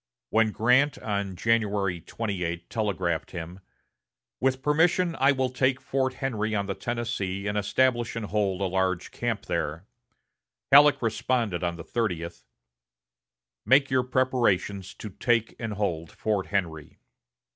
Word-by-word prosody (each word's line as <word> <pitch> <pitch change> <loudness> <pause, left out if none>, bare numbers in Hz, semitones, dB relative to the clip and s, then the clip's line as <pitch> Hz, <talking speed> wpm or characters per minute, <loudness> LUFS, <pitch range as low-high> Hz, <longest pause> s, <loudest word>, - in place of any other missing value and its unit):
When 110 0 +4
Grant, 125 +6 +3
on 100 -3 -3
January 100 -3 0
28, 90 -5 -4
telegraphed 95 -7 -1
him: 85 +1 -7 0.8
"With 130 0 0
permission, 165 +3 +2
I 135 +2 +5
will 130 -2 0
take 130 0 +1
Fort 130 0 -1
Henry 110 -5 -2
on 100 -1 0
the 100 - -2
Tennessee, 110 -5 -3
and 105 0 -2
establish 120 +3 +1
and 115 -2 -3
hold 100 -2 -1
a - - +1
large 95 -1 -1
camp - - -3
there," 80 +5 -3 0.9
Halleck 140 -1 +7
responded 115 -4 0
on 85 -1 -1
the 85 - -8
thirtieth: 90 -8 -3 1.2
"Make 135 +1 +4
your 130 -1 +3
preparations 120 -7 0
to 105 - -8
take 115 +3 0
and 115 -2 -3
hold 85 -6 -2
Fort 105 -3 -1
Henry." 85 -6 -3
110 Hz, 135 wpm, -26 LUFS, 95-130 Hz, 1.2 s, Halleck